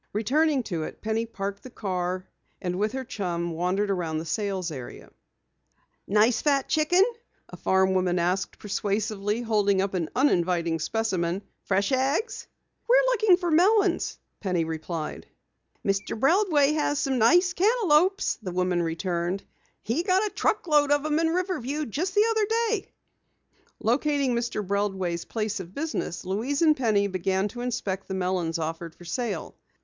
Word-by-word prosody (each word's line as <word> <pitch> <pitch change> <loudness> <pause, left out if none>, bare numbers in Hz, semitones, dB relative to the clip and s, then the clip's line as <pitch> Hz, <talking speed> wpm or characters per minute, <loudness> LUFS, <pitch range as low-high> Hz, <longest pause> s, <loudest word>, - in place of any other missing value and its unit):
Returning 275 +6 +2
to 175 -7 -3
it, 155 - -7
Penny 220 +1 -1
parked 200 -2 -5
the 255 - -10
car, 185 -4 -3 0.3
and 180 0 -3
with 215 +2 0
her 265 0 -3
chum 175 -6 -3
wandered 180 +5 0
about 170 -4 -1
the 160 - -4
sales 190 -1 -2
area. 130 -5 -9 1.0
"A - - -12
nice 215 +3 +4
fat 280 -2 +2
chicken?" 320 +5 +4 0.5
a - - -9
farm 190 0 +2
woman 185 -1 +1
asked 180 +3 -1
persuasively, 210 +1 -2
holding 205 -4 +2
up 195 0 0
an 170 -4 -1
uninviting 175 - +2
specimen. 185 -1 -1 0.2
"Fresh 200 +3 +1
eggs?" 270 - 0 0.4
"We're - - +6
looking 430 -6 +4
for 350 -2 -2
melons," 375 +2 +3 0.2
Penny 180 -5 0
replied. 160 0 -5 0.6
"Mr. 195 +2 -1
Breldway 305 - +3
has 295 -1 0
some 270 -3 0
nice 355 +11 +5
cantaloupes," 385 -3 +3
the 195 -6 -6
woman 180 -1 +1
returned. 175 +2 -2 0.4
"He 235 +9 0
got 375 +3 +2
a 415 - -4
truck 430 - 0
load 295 -3 +3
of 290 0 +2
'em 305 0 +1
in 330 - +2
from 325 - 0
Riverview 310 -6 -2
just 345 - -3
the 415 +1 +5
other 440 -2 +2
day." 450 -2 0 0.9
Locating 275 +2 +1
Mr. 235 -3 -2
Breldway's 190 -3 -1
place 215 -1 -2
of 185 0 -9
business, 290 - -3
Louise 235 - -1
and 310 -2 +5
Penny 220 -6 +2
began 190 +1 0
to 240 +3 -7
inspect 205 -6 -3
the 190 - -3
melons 180 -3 -1
offered 165 +1 -4
for 175 - -14
sale. 200 0 -3
215 Hz, 155 wpm, -26 LUFS, 185-295 Hz, 1.0 s, We're